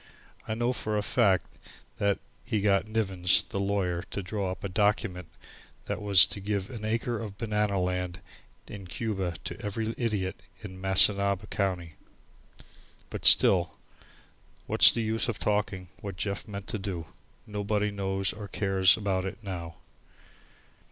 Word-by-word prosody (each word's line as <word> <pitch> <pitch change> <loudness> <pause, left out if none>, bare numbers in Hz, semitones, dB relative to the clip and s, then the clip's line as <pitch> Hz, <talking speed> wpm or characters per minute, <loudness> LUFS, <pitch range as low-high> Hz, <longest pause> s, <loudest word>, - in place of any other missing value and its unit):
I 110 - -2
know 120 +2 0
for 110 -3 -2
a 105 - -1
fact 100 -6 +1 0.4
that 100 -1 +2 0.3
he 110 -3 -1
got 100 0 +2
Nivens, 95 -5 +2
the 100 - -4
lawyer, 100 -3 -1
to 100 - -4
draw 100 0 -3
up 95 - -8
a - - -1
document 95 -2 0 0.6
that - - -4
was 100 -3 +7
to - - -5
give 100 +1 -3
an 115 -4 -7
acre 115 +1 -1
of 105 -4 -7
banana 105 -3 0
land 90 0 -2 0.5
in 100 -3 -9
Cuba 95 -3 -3
to - - -6
every 110 +2 -3
idiot 105 -6 -2 0.2
in 95 -3 -9
Missinaba 100 +1 +4
county. 90 -5 -2 1.1
But - - -5
still, 90 -3 +6 0.9
what's - - +7
the 115 - -2
use 110 +2 -1
of 110 - -2
talking 100 -3 -1
of - - -26
what 100 -3 -6
Jeff 100 +2 -3
meant 100 -2 -7
to 110 - -3
do? 95 -4 -5 0.4
Nobody 105 0 -1
knows 95 -1 -1
or 105 -1 -8
cares 95 -2 +3
about 95 -3 -1
it 95 - -5
now. 85 -4 -6
100 Hz, 150 wpm, -28 LUFS, 95-105 Hz, 1.1 s, was